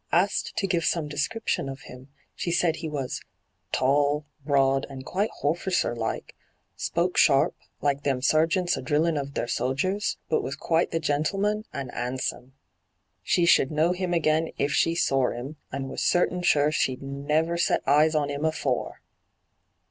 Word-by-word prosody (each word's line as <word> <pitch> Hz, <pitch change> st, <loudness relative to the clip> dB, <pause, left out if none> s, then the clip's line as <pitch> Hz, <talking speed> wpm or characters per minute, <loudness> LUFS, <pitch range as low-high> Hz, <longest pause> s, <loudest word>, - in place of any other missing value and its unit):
Asked 190 Hz, +4 st, +1 dB
to -, -, +1 dB
give 175 Hz, -3 st, 0 dB
some 160 Hz, -1 st, 0 dB
description 150 Hz, +2 st, -2 dB
of 135 Hz, 0 st, -7 dB
him, 125 Hz, +1 st, -12 dB, 0.3 s
she 170 Hz, -, -3 dB
said 170 Hz, -2 st, +2 dB
he 160 Hz, -, -5 dB
was 140 Hz, -4 st, -4 dB, 0.3 s
' -, -, -48 dB
tall, 145 Hz, +2 st, +2 dB, 0.2 s
broad, 135 Hz, -1 st, +2 dB
and 135 Hz, -1 st, -8 dB
quite 205 Hz, +4 st, -1 dB
horficer 170 Hz, -2 st, 0 dB
like; 115 Hz, -1 st, -4 dB, 0.4 s
spoke 175 Hz, +2 st, -1 dB
sharp, 140 Hz, -3 st, +4 dB, 0.3 s
like 140 Hz, -1 st, +1 dB
them 140 Hz, -3 st, 0 dB
sergeants 165 Hz, +6 st, +2 dB
a 130 Hz, -, -5 dB
drillin' 155 Hz, +4 st, +1 dB
of 140 Hz, -1 st, -4 dB
their -, -, -1 dB
sodgers; 165 Hz, +13 st, -1 dB
but -, -, +1 dB
was 135 Hz, -, -4 dB
quite 165 Hz, +4 st, +1 dB
the 165 Hz, -, -1 dB
gentleman, 195 Hz, +8 st, 0 dB
and 135 Hz, -3 st, -5 dB
'andsome. 125 Hz, +1 st, -4 dB, 0.7 s
She 175 Hz, -, +2 dB
should 135 Hz, -5 st, +5 dB
know 155 Hz, +3 st, +2 dB
him 180 Hz, 0 st, -2 dB
again 160 Hz, -1 st, +2 dB
if 140 Hz, +1 st, 0 dB
she 165 Hz, +3 st, +2 dB
sor 135 Hz, -8 st, +1 dB
'im, 135 Hz, +6 st, -7 dB
and 135 Hz, 0 st, -4 dB
was 135 Hz, -, -5 dB
certain 180 Hz, 0 st, +2 dB
sure 150 Hz, -4 st, +3 dB
she'd 130 Hz, -3 st, -1 dB
never 150 Hz, +5 st, 0 dB
set 170 Hz, -, +1 dB
eyes 150 Hz, +3 st, +4 dB
on 145 Hz, -1 st, +1 dB
'im 145 Hz, +1 st, -4 dB
afore.' 155 Hz, -5 st, -1 dB
150 Hz, 165 wpm, -26 LUFS, 135-170 Hz, 0.7 s, should